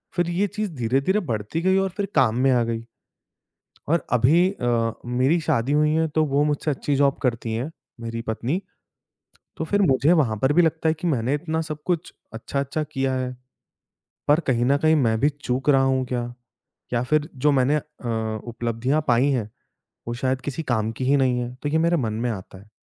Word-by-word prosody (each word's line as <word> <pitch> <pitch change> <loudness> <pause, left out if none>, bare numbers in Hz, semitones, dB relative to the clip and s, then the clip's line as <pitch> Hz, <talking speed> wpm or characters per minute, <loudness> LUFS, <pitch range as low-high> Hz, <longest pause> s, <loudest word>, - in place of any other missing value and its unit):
फिर 175 -1 +1
ये 185 +4 +1
चीज़ 210 -1 -4
धीरे-धीरे 135 - +1
बढ़ती 110 +10 -2
गई 190 +1 +3
और 195 0 +1
फिर 200 - 0
काम 115 -4 +4
में 135 - +5
आ 120 -2 +3
गई। 115 0 -3 1.0
और 165 +3 +1
अभी 150 +10 +4
अ, 120 - 0
मेरी 130 +7 +2
शादी 130 -2 0
हुई 150 0 +3
हैं 160 0 +2
तो 155 +1 +1
वो 140 +1 +1
मुझसे 150 +1 0
अच्छी 140 +1 -1
जॉब 140 0 +2
करती 115 -2 -1
हैं, 130 +8 -3 0.3
मेरी 115 0 -4
पत्नी। 130 - -1 1.0
तो 160 - -3
फिर 205 +5 +1
मुझे 140 +1 +4
वहाँ 130 -10 +2
पर 135 +2 +4
भी 175 +3 +5
लगता 160 0 +1
है 160 - +3
कि 175 - -2
मैंने 130 -3 +1
इतना 160 +1 -2
सब 155 -2 -6
कुछ 175 -2 -1 0.2
अच्छा-अच्छा 140 +6 -3
किया 135 -1 0
है। 125 -1 -3 0.9
पर 150 +3 +5
कहीं 120 -2 +2
न 140 +2 +3
कहीं 155 +1 +3
मैं 115 -6 +2
भी 145 - +3
चूक 135 -1 -3
रहा 135 -1 +5
हूँ 130 -1 +1
क्या? 120 -1 -3 0.6
या 120 0 +1
फिर 150 +3 +1
जो 145 +3 +3
मैंने 135 +2 +3
अ, 110 -6 -4
उपलब्धियाँ 120 +6 -1
पाई 125 +4 +4
हैं 115 -6 -1 0.6
वो 120 - -2
शायद 130 +1 -1
किसी 145 +5 -4
काम 110 0 0
की 130 +3 -4
ही 140 +2 +4
नहीं 125 -2 +2
हैं। 120 +1 -5
तो 145 - 0
ये 160 - +1
मेरे 170 +1 +2
मन 110 -6 -1
में - - +1
आता 95 -2 -8
है। 105 +3 -17
135 Hz, 200 wpm, -23 LUFS, 120-155 Hz, 1.0 s, में